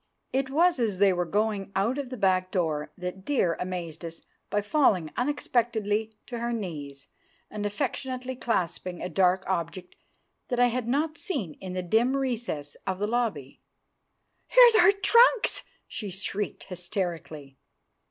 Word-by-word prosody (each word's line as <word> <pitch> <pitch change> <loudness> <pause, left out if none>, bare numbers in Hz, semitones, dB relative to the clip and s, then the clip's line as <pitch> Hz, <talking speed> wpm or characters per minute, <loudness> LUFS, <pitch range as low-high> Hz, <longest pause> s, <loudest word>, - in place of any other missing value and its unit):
It 265 0 0
was 335 +2 +3
as 215 -5 0
they 195 0 +5
were 175 0 0
going 205 0 -1
out 225 +8 +1
of 275 -3 -4
the 255 - -6
back 185 -2 +2
door 160 -6 -1
that 180 +1 -6
Dear 190 - +1
amazed 175 -3 -5
us 165 0 -7 0.3
by 205 - 0
falling 205 - +2
unexpectedly 225 -5 0
to 240 -2 -6
her 235 +1 -2
knees 150 - -5 0.5
and 205 -1 -2
affectionately 255 +2 -3
clasping 180 -6 -2
a 180 - -4
dark 185 +2 +3
object 180 0 -3 0.5
that 245 -2 -1
I 245 0 +5
had 240 0 -2
not 305 +5 0
seen 265 - -3
in 185 -1 -6
the 185 0 -2
dim 235 +9 +2
recess 235 - -3
of 190 -1 -1
the 205 - -1
lobby. 215 - -2 0.9
"Here's - - +8
our 440 -2 +7
trunks!" 465 +3 +4 0.3
she 210 - -6
shrieked 200 +2 -4
hysterically. 175 - -5
205 Hz, 150 wpm, -27 LUFS, 180-250 Hz, 0.9 s, Here's